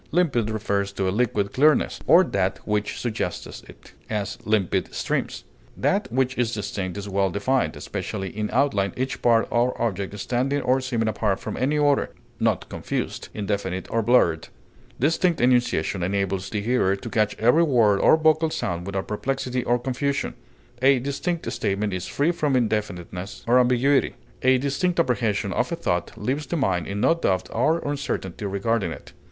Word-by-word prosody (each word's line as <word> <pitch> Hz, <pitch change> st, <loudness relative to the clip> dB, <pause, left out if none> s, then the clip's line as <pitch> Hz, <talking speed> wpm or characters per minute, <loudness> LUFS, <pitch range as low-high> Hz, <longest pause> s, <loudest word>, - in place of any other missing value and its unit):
Limpid 140 Hz, -11 st, +1 dB
refers 100 Hz, -2 st, -1 dB
to 95 Hz, -1 st, -1 dB
a -, -, +1 dB
liquid 105 Hz, -3 st, 0 dB
clearness, 150 Hz, +3 st, +3 dB
or 175 Hz, +3 st, +7 dB
that 95 Hz, -, -1 dB
which 105 Hz, -1 st, -1 dB
suggests 120 Hz, -3 st, -4 dB
it; -, -, -16 dB, 0.2 s
as, 105 Hz, -3 st, -3 dB
limpid 105 Hz, -4 st, 0 dB
streams. -, -, -2 dB, 0.3 s
That 195 Hz, -, 0 dB
which 130 Hz, +1 st, +1 dB
is 120 Hz, -2 st, 0 dB
distinct 100 Hz, -2 st, -4 dB
is 100 Hz, 0 st, -5 dB
well 100 Hz, 0 st, +1 dB
defined, 100 Hz, -3 st, 0 dB
especially 95 Hz, -1 st, -5 dB
in 105 Hz, 0 st, -2 dB
outline, 110 Hz, -8 st, +1 dB
each 130 Hz, +1 st, -3 dB
part 115 Hz, -1 st, +3 dB
or 120 Hz, +2 st, +1 dB
object 100 Hz, -3 st, -2 dB
standing 130 Hz, +7 st, -1 dB
or 130 Hz, +1 st, +2 dB
seeming 120 Hz, -4 st, -1 dB
apart 105 Hz, -3 st, 0 dB
from -, -, -5 dB
any 145 Hz, +4 st, 0 dB
other, 145 Hz, -1 st, +2 dB, 0.3 s
not -, -, +1 dB
confused, -, -, -4 dB
indefinite, 100 Hz, -3 st, -2 dB
or 115 Hz, -, +2 dB
blurred; 105 Hz, -9 st, +3 dB, 0.5 s
distinct 165 Hz, +5 st, +2 dB
enunciation 120 Hz, -8 st, +2 dB
enables 95 Hz, +1 st, -1 dB
the 105 Hz, -, -2 dB
hearer 105 Hz, -4 st, +2 dB
to 100 Hz, -, -9 dB
catch 105 Hz, -2 st, 0 dB
every 120 Hz, +9 st, +4 dB
word 115 Hz, -10 st, +4 dB
or 155 Hz, -, +5 dB
vocal 160 Hz, 0 st, +3 dB
sound 95 Hz, -, -3 dB
without 95 Hz, -1 st, -3 dB
perplexity 125 Hz, +2 st, -2 dB
or 120 Hz, -, +2 dB
confusion; 135 Hz, +3 st, -2 dB, 0.5 s
a 135 Hz, +1 st, +5 dB
distinct 140 Hz, +7 st, -3 dB
statement 100 Hz, +1 st, -1 dB
is 90 Hz, -1 st, -4 dB
free 145 Hz, +4 st, +1 dB
from 150 Hz, -5 st, 0 dB
indefiniteness 100 Hz, -5 st, -2 dB
or 125 Hz, +2 st, +5 dB
ambiguity; 125 Hz, +3 st, +3 dB, 0.3 s
a 130 Hz, 0 st, +4 dB
distinct 140 Hz, +7 st, 0 dB
apprehension 110 Hz, -8 st, 0 dB
of 125 Hz, -, 0 dB
a -, -, 0 dB
thought 90 Hz, -, -1 dB
leaves 135 Hz, +8 st, -2 dB
the 170 Hz, -, -2 dB
mind 95 Hz, -, 0 dB
in 100 Hz, +1 st, -3 dB
no -, -, +5 dB
doubt 95 Hz, -, 0 dB
or 150 Hz, +8 st, +2 dB
uncertainty 135 Hz, -9 st, -3 dB
regarding 100 Hz, -1 st, 0 dB
it. -, -, -10 dB
115 Hz, 165 wpm, -24 LUFS, 100-135 Hz, 0.5 s, or